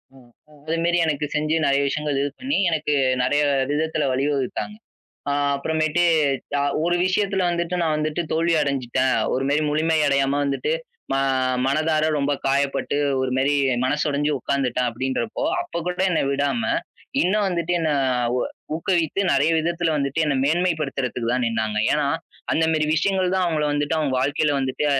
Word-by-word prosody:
ம், 120 -2 -19 0.2
ம். 145 - -20
அதுமாரி 165 +2 +1
எனக்குச் 150 -1 -2
செஞ்சு 155 +1 +1
நிறைய 140 0 +3
விஷயங்கள் 150 -1 -1
இது 145 - 0
பண்ணி, 275 +3 -1
எனக்கு 155 -2 -1 0.3
நிறைய 145 +4 +2 0.3
விதத்துல 155 0 0
வழிவகுத்தாங்க. 140 +8 -2 0.6
அ, - - +1 0.2
அப்புறமேட்டு 155 +3 0 0.6
அ - - +1 0.2
ஒரு 175 0 +2
விஷயத்துல 195 0 0
வந்துட்டு 170 +1 -2
நான் 160 -2 +1
வந்துட்டு 155 +2 -1
தோல்வியடைஞ்சுட்டேன். 140 -6 +1 0.2
ஒருமாரி 140 +4 +1
முழுமை 160 +2 +1
அடையாம 140 +1 +1
வந்துட்டு 140 - -1 0.4
மா 135 - +1 0.5
மனதார 155 +2 +1
ரொம்ப 140 +1 0
காயப்பட்டு 140 +1 0 0.2
ஒருமாரி 130 +2 +1 0.3
மனசு 145 +3 0
உடஞ்சு 145 +1 0
உட்கார்ந்துட்டேன், 125 -2 0
அப்பிடின்றப்போ 130 - -3 0.2
அப்பக் 175 - -5
கூட 180 +1 -1
என்ன - - +2
விடாம 145 +11 0 0.6
இன்னும் 205 +3 +2
வந்துட்டு 175 -1 -1
என்னை 160 -2 0 0.4
உ - - +1 0.4
ஊக்கவித்து 170 +1 0
நிறைய 140 +3 +3
விதத்துல 170 +1 0
வந்துட்டு 140 +2 -1
என்னை 145 -3 0
மேன்மைப்படுத்துறதுக்குதான் 135 -7 0
நின்னாங்க. 110 -2 -1
ஏன்னா, 150 -1 +1 0.5
அந்தமாரி 160 -1 +2
விஷயங்கள் 185 +2 +1
தான் 185 - +2
அவுங்கள 155 -3 0
வந்துட்டு 145 +2 0
அவுங்க 145 -4 0
வாழ்க்கையில 145 +2 +1
வந்துட்டு 135 +2 -1
150 Hz, 140 wpm, -22 LUFS, 140-165 Hz, 0.6 s, நிறைய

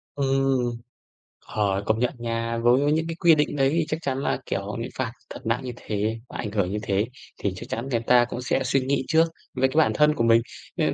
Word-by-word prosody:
Ừm. 135 -2 +1 0.8
Ờ, 100 -2 0
công 110 +1 +1
nhận 125 - +1
nha 115 0 -2
với 125 +5 +3
những 160 +1 +1
cái 165 - -4
quy 170 -2 +5
định 150 0 0
đấy 135 -1 +3
thì 165 -2 +2
chắc 155 - 0
chắn 135 -3 -2
là, 140 - 0
kiểu, 100 +1 -3
bị - - -4
phạt 125 -3 -1 0.2
thật - - -7
nặng 120 +4 0
như 125 - -4
thế, 110 0 -2
và - - -7
ảnh 105 -3 -4
hưởng 100 -3 0
như 105 - -2
thế 100 +1 0 0.3
thì 100 -2 -1
chắc - - -9
chắn 120 +4 -3
người 115 - +2
ta 120 +1 +4
cũng 125 - -4
sẽ 135 +2 0
suy 135 +2 +2
nghĩ 135 +1 0
trước 165 +1 +4 0.3
với 130 0 +2
cái 130 - -8
bản 160 - +5
thân 150 0 +4
của 115 - 0
mình. 115 0 +5 0.4
Nên - - +1
125 Hz, 240 wpm, -25 LUFS, 115-140 Hz, 0.8 s, quy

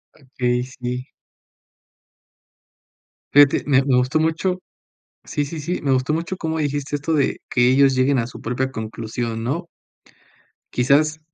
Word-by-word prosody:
Okey, 125 -3 -2
sí. 125 0 -5 2.2
Fíjate, 145 -1 +6
me 135 -2 +4
me 135 -2 +2
gustó 130 +5 +2
mucho. 170 +4 0 0.6
Sí, 145 - -2
sí, 155 +2 -6
sí, 175 +5 -3
me 140 - 0
gustó 130 +3 +1
mucho 170 +3 -3
como 160 -1 -2
dijiste 145 -1 -2
esto 145 +3 -2
de 145 -3 +1
que 125 0 +3
ellos 135 +1 +5
lleguen 130 +1 +2
a 115 -2 0
su 125 - -11
propia 130 +3 -2
conclusión, 115 0 -4
¿no? 165 +9 -2 1.1
Quizás 150 +5 +2
135 Hz, 140 wpm, -21 LUFS, 125-150 Hz, 2.2 s, Fíjate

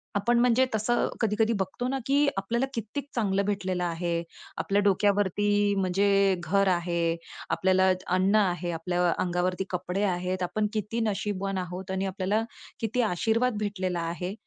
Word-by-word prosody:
आपण 235 +4 +2
म्हणजे 250 +1 +4
तसं 235 +3 +1
कधी-कधी 220 +1 +2
बघतो 190 +6 -2
ना, 270 +1 -1
की 285 +1 +3
आपल्याला 235 +7 0
कित्येक 230 +6 -4
चांगलं 200 -3 +1
भेटलेलं 185 -3 -1
आहे. 170 0 -1 0.3
आपल्या 200 +1 +1
डोक्यावरती 205 +1 +2
म्हणजे 195 +1 +3
घर 195 +2 +2
आहे. 170 -1 0 0.3
आपल्याला 190 0 +3 0.3
अन्न 190 +3 +3
आहे. 175 -4 +1
आपल्या 175 +1 0
अंगावरती 180 +1 0
कपडे 180 +2 -2
आहेत. 180 -1 -1
आपण 210 +4 0
किती 215 +2 -2
नशीबवान 195 -1 -2
आहोत. 185 +1 -5
आणि 190 +1 -1
आपल्याला 195 +3 0 0.4
किती 230 +3 0
आशीर्वाद 225 +3 +1
भेटलेला 185 -4 -2
आहे. 180 +2 -4
195 Hz, 140 wpm, -27 LUFS, 180-215 Hz, 0.4 s, म्हणजे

